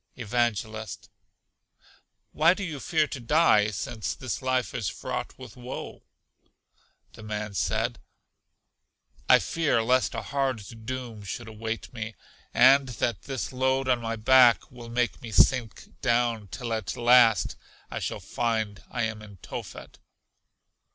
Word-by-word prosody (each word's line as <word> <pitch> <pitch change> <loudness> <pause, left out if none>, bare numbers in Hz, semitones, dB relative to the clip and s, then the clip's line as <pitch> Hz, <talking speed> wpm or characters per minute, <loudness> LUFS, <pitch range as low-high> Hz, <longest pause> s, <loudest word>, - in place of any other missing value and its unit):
Evangelist. 110 -4 -2 1.2
Why 165 +4 +4
do 200 - -5
you 155 -6 -4
fear 155 +1 +1
to 140 - -6
die, 120 -5 +4
since 105 +2 -4
this 130 0 -4
life 130 -1 0
is 115 -6 -2
fraught - - -5
with - - -11
woe? 125 +1 -7 1.1
The - - -12
man 105 -1 -4
said, - - -1 1.3
I - - +9
fear 150 -9 +1
lest 125 -3 +2
a - - -3
hard 115 -6 -3
doom 125 -4 -5
should 110 +4 -6
wait 110 +2 -5
me, 110 -1 -6 0.4
and 135 0 +6
that 115 -1 -1
this 135 -1 -4
load 130 +1 +1
on 125 -2 +2
my 115 0 -2
back 125 +1 +5
will 120 -2 -10
make 120 +2 -1
me 120 - -7
sink 120 0 +2
down, 120 -3 +1
till 115 +4 -5
at 110 -1 -3
last, 120 -5 +5 0.4
I - - -3
shall - - -3
find 110 -3 -2
I 120 -2 -2
am 110 -1 -3
in 100 -2 -12
Tophet. - - -8
120 Hz, 140 wpm, -27 LUFS, 110-130 Hz, 1.3 s, I